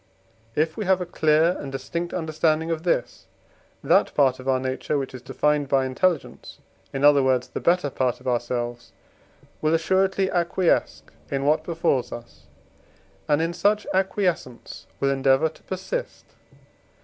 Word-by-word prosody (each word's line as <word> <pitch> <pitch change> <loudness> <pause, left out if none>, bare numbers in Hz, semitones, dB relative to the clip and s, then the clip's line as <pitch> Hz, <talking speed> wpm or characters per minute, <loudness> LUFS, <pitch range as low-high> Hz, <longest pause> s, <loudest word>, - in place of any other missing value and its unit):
If 155 +1 0
we 215 - -3
have 190 0 +3
a 180 - -3
clear 160 +1 +2
and 140 - -6
distinct 140 +6 -4
understanding 160 -1 0
of 160 -1 -2
this, 165 -8 -2 0.6
that - - +3
part 130 -3 +3
of 130 - -9
our 130 -1 +2
nature 130 +3 -2
which 135 -1 -4
is 130 - -8
defined 145 +2 0
by 135 -1 +2
intelligence, 155 +5 -2 0.3
in 135 0 -3
other 145 -1 +6
words 130 -1 +1
the - - -5
better 170 -5 +1
part 130 -2 -1
of - - -11
ourselves, 120 -1 -2 0.7
will 155 +1 +2
assuredly 190 +3 +1
acquiesce 175 0 +1 0.3
in 140 0 -2
what 150 +2 +2
befalls 165 -8 0
us, 80 -10 -11 0.8
and 150 +2 +2
in 165 +1 -1
such 205 +4 +1
acquiescence 185 - -2
will 135 0 +1
endeavour 135 +3 +3
to 160 - -20
persist. - - -5
150 Hz, 150 wpm, -24 LUFS, 130-175 Hz, 0.8 s, other